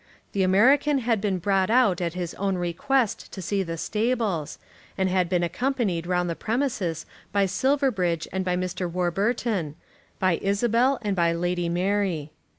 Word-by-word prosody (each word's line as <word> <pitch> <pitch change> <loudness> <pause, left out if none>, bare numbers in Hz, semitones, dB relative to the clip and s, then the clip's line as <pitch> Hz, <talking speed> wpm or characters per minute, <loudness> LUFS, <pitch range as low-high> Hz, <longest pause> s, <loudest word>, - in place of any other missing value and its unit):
The 200 - -1
American 260 +10 +4
had 230 -5 0
been 200 -3 0
brought 190 +1 +1
out 225 -7 +3
at 170 -1 -2
his 175 -2 -4
own 195 -1 -1
request 185 +8 -1
to - - -7
see 195 +2 -1
the 165 -3 -4
stables, 215 - -1 0.4
and 190 -1 +1
had 185 -2 +1
been 180 -1 +1
accompanied 205 -4 -1
round 180 -1 +1
the 170 - -2
premises 220 - -2 0.3
by 200 0 +3
Silverbridge 195 - +1
and 190 0 -1
by 180 -1 0
Mr. 180 -1 -3
Warburton, 185 -1 -1 0.4
by 185 -3 +1
Isabel 235 +6 +2
and 205 -2 0
by 170 -2 +2
Lady 175 0 -1
Mary. 180 -4 0
190 Hz, 155 wpm, -25 LUFS, 175-225 Hz, 0.4 s, American